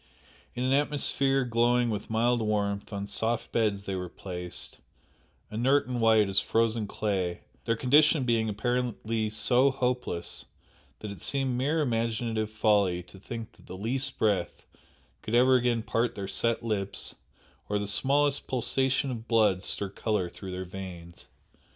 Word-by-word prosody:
In 125 - -2
an 130 +1 +2
atmosphere 140 -2 +2
glowing 120 0 +2
with 105 -1 -4
mild 120 +2 +2
warmth, 100 -2 -1
on 100 -1 -3
soft 115 +3 -2
beds 105 -3 +1
they 100 - -4
were 90 -1 -4
placed, 90 -1 -7 0.7
inert 130 +6 +2
and 125 -1 -3
white 110 -2 +5
as 95 0 +3
frozen 115 -1 +1
clay, 95 -5 -2 0.2
their 115 - +1
condition 145 +4 +4
being 115 -3 +1
apparently 115 0 -1
so 120 +5 +3
hopeless 125 -9 -2 0.6
that 105 - -5
it 100 -4 -10
seemed 135 -2 0
mere 145 +6 +1
imaginative 115 -3 -1
folly 105 -4 +2
to 95 +2 -15
think 115 +2 -7
that - - -21
the 95 - -7
least 130 +6 -1
breath 105 -3 0 0.6
could 110 - -2
ever 130 +2 +5
again 120 -2 +2
part 115 +1 0
their 100 -1 -4
set 115 +3 0
lips 100 -3 -2 0.6
or 105 - +1
the 105 - -2
smallest 140 +7 +1
pulsation 130 +1 +1
of 115 -1 -6
blood 110 -5 +3
stir 100 0 -2
colour 100 -4 -1
through 95 +2 -9
their 95 0 -4
veins. 90 -2 -9
115 Hz, 150 wpm, -28 LUFS, 100-125 Hz, 0.7 s, white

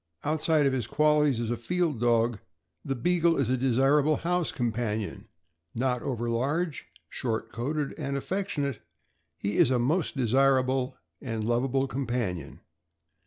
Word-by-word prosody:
Outside 155 0 +2
of 135 - +2
his 125 -5 -1
qualities 150 -3 +3
as 120 -1 -2
a - - +1
field 160 +2 -1
dog, 115 -2 +2 0.4
the 135 - -2
Beagle 170 +5 +2
is 135 -4 +1
a 130 - +3
desirable 135 +4 +3
house 175 +1 0
companion; 115 -6 -2 0.5
not 125 0 0
over 120 -3 -3
large, 140 +7 -1 0.2
short 115 -3 -3
coated, 140 +5 -2
and 140 -2 -2
affectionate, 145 - -2 0.6
he 100 +1 -2
is - - +6
a 130 - +2
most 150 +6 0
desirable 130 +1 +2 0.2
and 115 -4 -3
lovable 130 +4 +1
com 135 -1 -3
panion. 95 - -3
130 Hz, 140 wpm, -28 LUFS, 120-150 Hz, 0.6 s, is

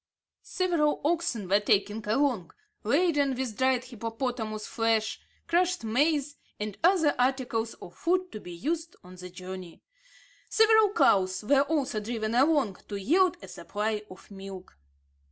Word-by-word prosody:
Several 340 -5 0
oxen 310 - 0
were 200 +2 +4
taken 205 +1 +1
along, 220 - 0 0.3
laden 285 +1 +2
with 250 -4 -3
dried 260 +1 +2
hippopotamus 230 -2 -4
flesh, 225 -1 0 0.3
crushed 360 -1 +1
maize, 285 +5 +1 0.2
and 210 -1 -4
other 340 -4 +4
articles 245 -3 0
of 175 - -12
food 365 +2 0
to 215 - -7
be 180 - -10
used 325 - -3
on 180 0 -13
the 180 0 -9
journey. 185 -1 -9 0.7
Several 440 -2 +5
cows 185 - +3
were 275 +5 +4
also 280 -6 0
driven 220 0 -3
along 265 - +3
to 205 - -5
yield 345 - +2
a - - -8
supply 210 +1 -3
of 185 +2 -14
milk. 195 -1 -10
240 Hz, 135 wpm, -28 LUFS, 210-305 Hz, 0.7 s, Several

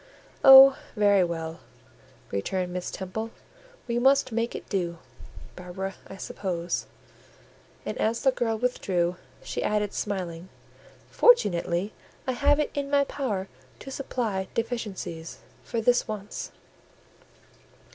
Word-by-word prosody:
"Oh, 270 0 +10 0.2
very 205 -3 +4
well!" 165 -1 -4 0.7
returned 180 - -2
Miss 180 0 -3
Temple; 205 +4 -5 0.6
"we 235 0 0
must 270 +1 +4
make 230 +1 -1
it - - -7
do, 175 -4 -2 0.6
Barbara, 185 +2 -5
I 195 - -10
suppose." 175 -3 -3 1.0
And - - -3
as 225 +1 0
the 265 - +5
girl 230 -3 -1
withdrew 180 -7 0 0.3
she - - -4
added, 210 -1 0
smiling, 185 -3 -4 0.6
"Fortunately, 195 - +3 0.3
I 260 - 0
have 285 +4 +3
it 300 - 0
in 280 -1 -3
my 285 0 +4
power 220 -9 -3 0.3
to 270 - -9
supply 225 -8 -2
deficiencies 210 -8 -4 0.3
for 230 - -2
this 245 +2 +3
once." 210 -2 -6
205 Hz, 115 wpm, -27 LUFS, 180-245 Hz, 1.0 s, Oh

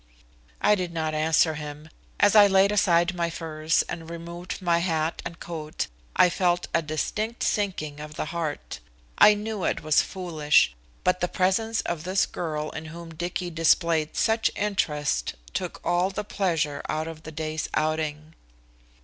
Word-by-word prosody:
I 210 - +5
did 180 -4 -1
not 160 -2 -2
answer 160 +1 +3
him. 150 0 -7 0.3
As 205 +1 +5
I 205 -1 +9
laid 195 +1 +4
aside 175 -3 +3
my 170 -1 -1
furs 160 -1 0
and 165 -1 -6
removed 170 +1 -6
my 170 -3 +2
hat 165 -2 -1
and 165 - -7
coat 155 -3 -4 0.3
I - - +6
felt 175 0 +1
a 165 - +3
distinct 210 +9 -2
sinking 165 -8 -1
of 150 0 -8
the - - -2
heart. 160 - -4 0.4
I 210 - +8
knew 210 -2 -4
it - - -1
was 155 -1 +4
foolish, 155 - +2 0.3
but 180 0 +2
the 180 - +1
presence 205 +6 +1
of 165 -3 -3
this 185 +2 +2
girl 155 -3 -4
in 160 - -7
whom 165 +1 -9
Dicky 175 +2 -3
displayed 165 -1 +2
such 225 0 +2
interest 150 - -1 0.2
took - - -3
all 175 +2 +2
the 205 +2 -4
pleasure 165 -8 -1
out 155 +1 -1
of 165 -1 -8
the 160 - -9
day's 155 0 -3
outing. 155 0 -1
170 Hz, 160 wpm, -26 LUFS, 155-185 Hz, 0.4 s, I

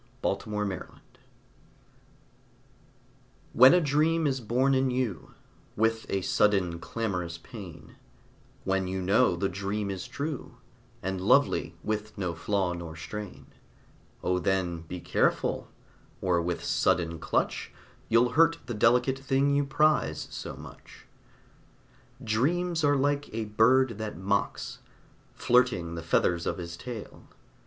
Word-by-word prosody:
A - - +2
PINCH - - -13
OF - - -7 0.2
SALT 90 - -8 2.6
When 130 +7 +8
a - - +5
dream 160 +2 +2
is 135 -3 0
born 125 +5 +2
in 130 0 +2
you 125 - -3 0.4
With 110 +1 +1
a 95 - 0
sudden 95 -5 +2
clamorous 90 -4 -3
pain, 90 - -11 0.7
When 95 -1 0
you 95 +1 -2
know 95 +2 +3
the 95 +3 0
dream 100 +2 -3
is 95 -2 -5
true 145 -1 -5 0.5
And 95 0 -2
lovely, - - +3
with 105 0 -3
no 90 -4 -2
flaw 90 +2 -1
nor 85 -2 -7
stain, 105 +5 -7 0.8
O 90 0 +1
then, 90 -3 0
be 90 +1 -6
careful, - - 0 0.5
or 90 -2 +1
with 85 0 -3
sudden 85 -2 +1
clutch - - -1 0.4
You'll 115 +2 +4
hurt 165 +6 +4
the 120 - -4
delicate 125 +4 +3
thing 135 +1 +1
you 145 - +3
prize 155 +2 +1
so - - -6
much. - - -13 1.2
Dreams 160 +10 0
are 145 -1 +4
like 145 +1 0
a 115 -1 -2
bird 115 +2 +3
that 110 -5 -4
mocks, 100 +2 -2 0.6
Flirting 120 -9 +2
the 85 - -5
feathers 85 +1 +1
of - - -1
his 85 -1 -6
tail. 115 +3 -8
105 Hz, 130 wpm, -28 LUFS, 90-130 Hz, 2.6 s, When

